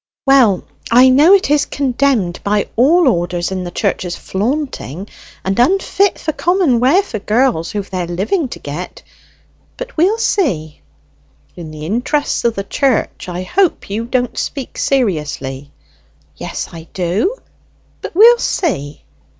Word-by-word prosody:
"Well, 255 Hz, -9 st, +4 dB, 0.3 s
I 250 Hz, +2 st, +6 dB
know 295 Hz, +8 st, +6 dB
it 380 Hz, -7 st, 0 dB
is 295 Hz, -1 st, +2 dB
condemned 255 Hz, -9 st, 0 dB
by 205 Hz, 0 st, 0 dB
all 310 Hz, +7 st, +4 dB
orders 175 Hz, -4 st, 0 dB
in 185 Hz, -1 st, -3 dB
the -, -, -4 dB
church 195 Hz, +2 st, -1 dB
as 175 Hz, -1 st, -4 dB
flaunting, 205 Hz, -, -3 dB, 0.4 s
and 190 Hz, +3 st, -1 dB
unfit 390 Hz, +7 st, +2 dB
for 315 Hz, -, -3 dB
common 345 Hz, -7 st, +1 dB
wear 285 Hz, +11 st, +4 dB
for 225 Hz, -, -6 dB
girls 215 Hz, -5 st, +1 dB
who've 205 Hz, -2 st, -4 dB
their 180 Hz, -2 st, -3 dB
living 205 Hz, -, -1 dB
to -, -, -8 dB
get; 150 Hz, +5 st, -7 dB, 0.7 s
but -, -, -7 dB
we'll 380 Hz, +8 st, +3 dB
see." 240 Hz, -, -1 dB, 0.7 s
"In 165 Hz, -3 st, -8 dB
the 155 Hz, 0 st, -8 dB
interest 245 Hz, -, -1 dB
of 230 Hz, -1 st, +1 dB
the 195 Hz, -, -3 dB
church, 250 Hz, -3 st, -1 dB
I 180 Hz, +1 st, -4 dB
hope 355 Hz, -, 0 dB
you 220 Hz, +3 st, -2 dB
don't 245 Hz, 0 st, -1 dB
speak 275 Hz, -4 st, -5 dB
seriously." 150 Hz, -, -2 dB, 0.6 s
"Yes, -, -, -5 dB
I 165 Hz, -1 st, -10 dB
do; 190 Hz, -, 0 dB, 0.7 s
but -, -, -7 dB
we'll 470 Hz, +5 st, +7 dB
see." 150 Hz, -, -2 dB
235 Hz, 145 wpm, -16 LUFS, 180-295 Hz, 0.7 s, we'll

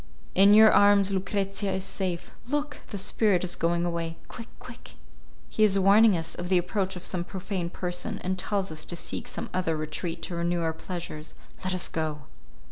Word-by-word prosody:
In 200 Hz, +2 st, +7 dB
your 220 Hz, 0 st, +8 dB
arms 200 Hz, -1 st, +5 dB
Lucrezia 195 Hz, +1 st, -1 dB
is 190 Hz, 0 st, -2 dB
safe. 185 Hz, -3 st, -3 dB, 0.2 s
Look! 290 Hz, +2 st, -2 dB
the 205 Hz, -, -5 dB
spirit 195 Hz, -1 st, +1 dB
is 180 Hz, -, -1 dB
going 170 Hz, +1 st, 0 dB
away. 165 Hz, -1 st, -3 dB
Quick, 230 Hz, -, -9 dB
quick! -, -, -12 dB, 0.5 s
He 215 Hz, -, 0 dB
is 200 Hz, -2 st, +5 dB
warning 200 Hz, +1 st, +6 dB
us 165 Hz, 0 st, -3 dB
of 175 Hz, 0 st, -6 dB
the 185 Hz, -, +4 dB
approach 190 Hz, +2 st, -1 dB
of 180 Hz, -, -7 dB
some 180 Hz, -2 st, -2 dB
profane 185 Hz, -1 st, -4 dB
person, 175 Hz, 0 st, -2 dB
and 185 Hz, +1 st, -1 dB
tells 195 Hz, -2 st, -1 dB
us 155 Hz, 0 st, -5 dB
to 175 Hz, -, -3 dB
seek -, -, -5 dB
some -, -, -5 dB
other 180 Hz, -3 st, 0 dB
retreat 155 Hz, +2 st, -4 dB
to -, -, -3 dB
renew 170 Hz, 0 st, 0 dB
our 160 Hz, -1 st, 0 dB
pleasures. 165 Hz, -2 st, -7 dB, 0.3 s
Let 185 Hz, 0 st, -1 dB
us 180 Hz, -, -1 dB
go." 155 Hz, -2 st, -3 dB
185 Hz, 190 wpm, -27 LUFS, 170-200 Hz, 0.5 s, your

